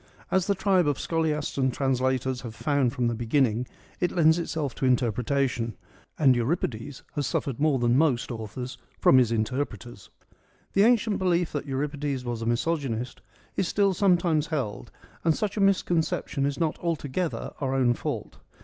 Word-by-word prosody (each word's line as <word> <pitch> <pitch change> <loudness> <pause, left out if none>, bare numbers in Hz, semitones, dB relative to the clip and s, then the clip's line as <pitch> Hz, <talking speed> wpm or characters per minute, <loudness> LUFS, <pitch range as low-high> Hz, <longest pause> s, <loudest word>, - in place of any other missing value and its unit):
As 190 -2 +2
the 200 - +2
tribe 190 -3 +2
of 145 -2 +1
scholiasts 155 -3 -1
and 130 -1 +2
translators 130 -1 0
have 115 -3 -8
found 140 -4 +1
from 125 -1 -1
the 120 - +1
beginning, 120 0 +1 0.3
it 180 - +1
lends 160 -1 +4
itself 155 -6 -2
to - - -2
interpretation; 125 -1 0 0.4
and 135 -5 +5
Euripides 125 -1 -2
has 145 -3 -1
suffered 135 -2 -2
more 150 -2 +3
than 120 -1 +2
most 135 -6 +1
authors 120 +3 -6 0.2
from 130 - +6
his 120 -3 +2
interpreters. 115 -2 -3 0.6
The 200 +2 +5
ancient 230 -3 +3
belief 175 -2 +1
that 145 0 -4
Euripides 140 -1 -2
was 120 -2 -3
a 115 - -3
misogynist 125 -1 -1 0.3
is 190 - 0
still 200 0 +2
sometimes 175 -5 +2
held, 135 -10 -3 0.3
and 165 -2 +3
such 210 -2 -2
a 210 - -1
misconception 170 -7 +1
is 140 +2 -3
not 160 -2 0
altogether 165 0 -2
our 135 -2 -1
own 125 -2 +3
fault. - - -5
140 Hz, 160 wpm, -26 LUFS, 125-165 Hz, 0.6 s, from